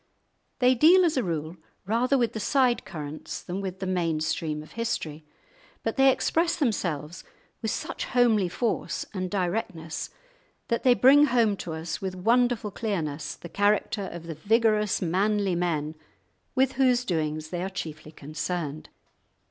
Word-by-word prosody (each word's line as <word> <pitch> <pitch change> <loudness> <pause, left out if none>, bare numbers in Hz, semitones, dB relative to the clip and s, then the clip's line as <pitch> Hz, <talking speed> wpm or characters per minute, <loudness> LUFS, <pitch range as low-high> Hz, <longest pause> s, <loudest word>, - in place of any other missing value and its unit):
They 250 0 +5
deal 345 +8 +6
as 330 - +1
a 260 - +2
rule 165 -3 -3 0.3
rather 240 +6 +2
with 240 -3 +1
the 220 - -4
side 250 +2 +2
currents 155 -3 -6
than 185 +3 -4
with 190 -1 -4
the 190 - -4
main 170 -4 0
stream 155 -1 -2
of 155 - -16
history; 160 -9 -3 0.6
but - - -1
they 270 -1 +6
express 330 +5 +1
themselves 175 - -2 0.4
with 220 - -1
such - - -3
homely 225 -7 +3
force 230 +5 -2
and 185 -2 -3
directness 180 -4 -3 0.6
that 235 -1 +1
they 250 -2 +5
bring 280 +4 +7
home 235 -6 +2
to 170 - -5
us 160 +1 -4
with 190 -1 -3
wonderful 235 +2 +2
clearness 160 -9 -3
the - - -10
character 205 +1 +1
of 170 -1 -8
the 165 - -5
vigorous 210 +3 +2
manly 195 +3 +1
men 160 -3 -1 0.6
with 265 0 +3
whose 250 -2 +2
doings 155 -3 -2
they 175 -1 -3
are 190 - -2
chiefly 155 -4 -7
concerned. 155 0 -4
195 Hz, 155 wpm, -27 LUFS, 160-235 Hz, 0.6 s, bring